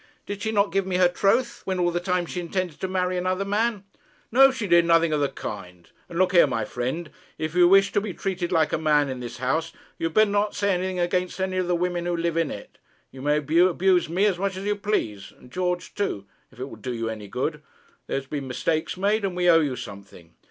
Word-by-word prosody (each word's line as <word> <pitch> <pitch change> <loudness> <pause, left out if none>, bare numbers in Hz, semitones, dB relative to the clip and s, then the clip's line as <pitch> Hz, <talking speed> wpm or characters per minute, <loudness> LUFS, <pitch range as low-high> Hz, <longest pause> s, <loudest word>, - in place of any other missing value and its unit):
Did 205 0 -6
she 220 +1 -1
not 205 -1 +2
give 195 -1 0
me 185 - -1
her 180 0 +5
troth, 215 +7 +1
when 190 -1 -2
all 175 -1 +2
the 175 - -1
time 180 -1 -1
she 180 - -5
intended 175 -2 -3
to 190 - -1
marry 185 -1 -1
another 185 +2 -1
man?' 210 +1 0 0.5
'No! 270 +3 +7
She 260 -5 -3
did 170 -2 +5
nothing 165 -1 +3
of 150 - +1
the 140 - +1
kind. 90 -4 -8 0.2
And 170 - -6
look 185 0 +3
here, 175 -5 +6
my 115 -5 -2
friend, 130 +9 -4 0.3
if 155 0 -3
you 175 0 +6
wish 195 +1 +5
to 205 - +1
be 205 -1 -4
treated 180 -1 -3
like 160 -3 +2
a - - +1
man 150 -3 +2
in 130 -1 -4
this 120 -1 -7
house, 155 +6 -1 0.3
you 165 - 0
had 165 - -9
better 215 -1 +5
not 205 +1 0
say 200 -1 +1
anything 185 +1 -2
against 180 +1 -1
any 190 0 -1
of 185 -1 0
the 175 - +2
women 175 0 -1
who 175 -1 0
live 170 -1 -1
in 165 -2 +1
it. - - -9 0.3
You 130 - -11
may 145 +2 +2
abuse 175 +4 +3
me 185 +5 +2
as 190 -4 +1
much 195 -1 -1
as 195 - -6
you 205 0 +1
please, 200 - -2
and 125 - -17
George 180 +2 -2
too, 105 - -2 0.3
if - - -19
it 130 - -3
will - - -10
do 125 -2 -5
you 115 0 -3
any 110 -2 -6
good. 140 +8 -3 0.5
There - - -1
have 135 - -13
been 140 -2 -4
mistakes 155 +7 -1
made, 205 +3 +1
and 190 -2 -2
we 180 0 +1
owe 165 - +6
you 140 -4 -1
something.' 100 -7 -11
175 Hz, 250 wpm, -25 LUFS, 150-190 Hz, 0.5 s, No